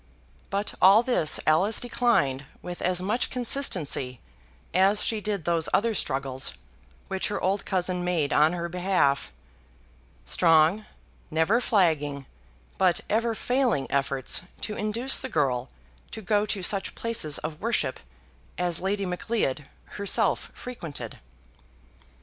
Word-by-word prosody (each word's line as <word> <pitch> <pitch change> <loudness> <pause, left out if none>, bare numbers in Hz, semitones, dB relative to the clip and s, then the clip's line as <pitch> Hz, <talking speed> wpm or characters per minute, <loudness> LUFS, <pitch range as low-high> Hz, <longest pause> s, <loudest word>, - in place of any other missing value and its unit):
But 200 +1 -2
all 200 +5 +7
this 240 -11 +2
Alice 185 +8 +3
declined 230 - +1 0.2
with 175 0 -7
as 180 0 +1
much 215 +6 0
consistency 180 - +1 0.5
as 195 +3 +3
she 220 -2 +1
did 205 -5 -3
those 170 -2 +1
other 230 +2 +1
struggles 135 -7 -2 0.5
which 190 -1 -2
her 205 - -3
old 195 +2 -1
cousin 180 -1 -1
made 170 -5 0
on 155 +3 +4
her 170 -1 -3
behalf, 175 - 0 0.9
strong, 160 - +3 0.4
never 160 +10 +2
flagging, 150 - +1 0.5
but 185 -2 +3
ever 230 +1 +1
failing 245 - 0
efforts 135 -1 +1 0.2
to 210 - -4
induce 230 +5 +1
the - - -5
girl 130 -4 0 0.4
to 220 - -8
go 205 +2 +1
to 195 -3 -3
such 195 +1 +1
places 220 -11 0
of 155 0 -6
worship 225 - -1 0.6
as 175 -2 -1
Lady 195 +1 -1
Macleod 180 - -2 0.2
herself 200 -1 0
frequented. 155 - -8
180 Hz, 125 wpm, -26 LUFS, 150-210 Hz, 0.9 s, all